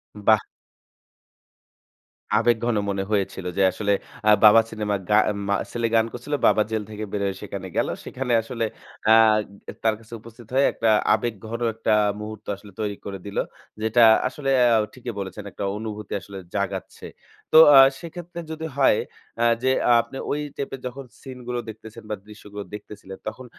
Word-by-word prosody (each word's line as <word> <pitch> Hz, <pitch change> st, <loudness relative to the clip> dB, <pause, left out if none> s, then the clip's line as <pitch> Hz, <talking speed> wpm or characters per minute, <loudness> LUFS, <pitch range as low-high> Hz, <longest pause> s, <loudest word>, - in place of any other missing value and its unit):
বাহ! 105 Hz, +1 st, +4 dB, 1.9 s
আবেগঘন 115 Hz, +1 st, +2 dB
মনে 100 Hz, -1 st, -1 dB
হয়েছিল 95 Hz, -2 st, -1 dB
যে -, -, +2 dB
আসলে 100 Hz, +2 st, -1 dB, 0.4 s
আ -, -, +7 dB
বাবা 110 Hz, +1 st, +9 dB
সিনেমার 105 Hz, -2 st, -2 dB
গা 105 Hz, -, +5 dB, 0.3 s
মা 100 Hz, -, +2 dB, 0.2 s
ছেলে 115 Hz, -1 st, -1 dB
গান 115 Hz, -, +4 dB
করছিল। 125 Hz, +5 st, -6 dB
"বাবা 105 Hz, -, +4 dB
জেল 110 Hz, -1 st, -1 dB
থেকে 105 Hz, 0 st, -6 dB
বের 105 Hz, -, -2 dB
হয়ে 95 Hz, -1 st, -2 dB
সেখানে 100 Hz, -2 st, -6 dB
গেল। -, -, +2 dB, 0.2 s
সেখানে 125 Hz, -2 st, -3 dB
আসলে 115 Hz, 0 st, -3 dB, 0.4 s
আ -, -, +7 dB, 0.6 s
গ -, -, -6 dB
তার 110 Hz, -1 st, +3 dB
কাছে 115 Hz, +1 st, -15 dB
উপস্থিত 115 Hz, 0 st, -14 dB
হয়ে 135 Hz, +1 st, +5 dB
একটা 115 Hz, -, +1 dB, 0.2 s
আবেগঘন 110 Hz, +1 st, -3 dB
একটা 115 Hz, 0 st, -1 dB, 0.3 s
মুহূর্ত 105 Hz, 0 st, -8 dB
আসলে 100 Hz, +1 st, -15 dB
তৈরি 105 Hz, -2 st, -2 dB
করে 100 Hz, -1 st, -5 dB
দিলো।" 100 Hz, -, -1 dB, 0.4 s
যেটা 110 Hz, +2 st, +3 dB, 0.3 s
আসলে 135 Hz, +2 st, -4 dB
অ্যা 120 Hz, -2 st, +5 dB, 0.2 s
ঠিকই 125 Hz, -2 st, -7 dB
বলেছেন 95 Hz, +1 st, -6 dB
একটা -, -, -6 dB
অনুভূতি 105 Hz, -1 st, -6 dB
আসলে 100 Hz, -1 st, -10 dB, 0.2 s
জাগাচ্ছে। 100 Hz, -1 st, -4 dB, 0.5 s
তো -, -, +8 dB, 0.2 s
আ -, -, +11 dB, 0.2 s
সেক্ষেত্রে 170 Hz, +1 st, -8 dB
যদি 160 Hz, 0 st, -5 dB
হয় 135 Hz, -6 st, +4 dB, 0.4 s
অ্যা 120 Hz, -, +1 dB, 0.2 s
যে 130 Hz, -, +3 dB, 0.2 s
আ -, -, +6 dB
আপনি 115 Hz, +3 st, -10 dB
ওই 145 Hz, -, 0 dB, 0.2 s
টাইপের 135 Hz, -1 st, -4 dB
যখন 135 Hz, +2 st, -8 dB, 0.2 s
সিনগুলো 125 Hz, -2 st, -6 dB
দেখতেছেন 110 Hz, +1 st, -11 dB
বা 105 Hz, -, -1 dB
দৃশ্যগুলো 105 Hz, -1 st, -9 dB
দেখতেছিলেন, 105 Hz, -2 st, -9 dB
তখন 115 Hz, +4 st, -6 dB
110 Hz, 165 wpm, -24 LUFS, 105-120 Hz, 1.9 s, আ